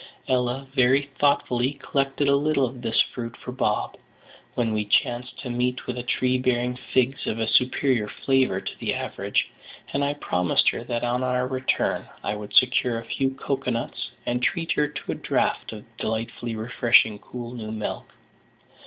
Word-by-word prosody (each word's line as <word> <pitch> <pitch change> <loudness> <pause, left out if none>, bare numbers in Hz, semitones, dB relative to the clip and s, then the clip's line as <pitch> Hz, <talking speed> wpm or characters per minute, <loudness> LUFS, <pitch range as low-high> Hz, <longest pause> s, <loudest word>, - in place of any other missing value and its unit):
Ella 125 +1 0
very 135 +1 +3
thoughtfully 135 -2 +2
collected 140 0 -1
a 140 - +5
little 145 -1 +2
of 125 0 -7
this 115 -2 0
fruit 120 -1 -5
for 125 - -7
Bob, 105 -4 -1 0.6
when 115 -3 +1
we 105 -1 +1
chanced 120 +4 +1
to 125 - -5
meet 125 +1 -1
with 125 - -3
a 125 - -3
tree 125 +1 +1
bearing 125 -1 +1
figs 130 +1 0
of 110 - -1
a 110 -1 -1
superior 125 -2 +2
flavour 130 -5 +1
to 95 - -7
the - - -1
average, - - -1 0.4
and 140 - +1
I 145 +1 0
promised 90 -10 +1
her - - -4
that 120 0 -2
on 120 +1 0
our 125 0 +1
return 130 0 0
I 100 - -1
would 105 -1 -7
secure 125 -1 +4
a 115 - -9
few 135 +2 -1
cocoa 135 -1 -2
nuts, 115 -1 -3 0.2
and 120 0 0
treat 165 +5 0
her 150 - +2
to 150 - -5
a - - 0
draught - - 0
of 105 -2 -8
the 120 0 -15
delightfully 115 +1 -3
refreshing 110 -1 +3
cool 120 +1 -7
new 110 -3 -6
milk. 110 -1 -4
125 Hz, 180 wpm, -25 LUFS, 115-135 Hz, 0.6 s, a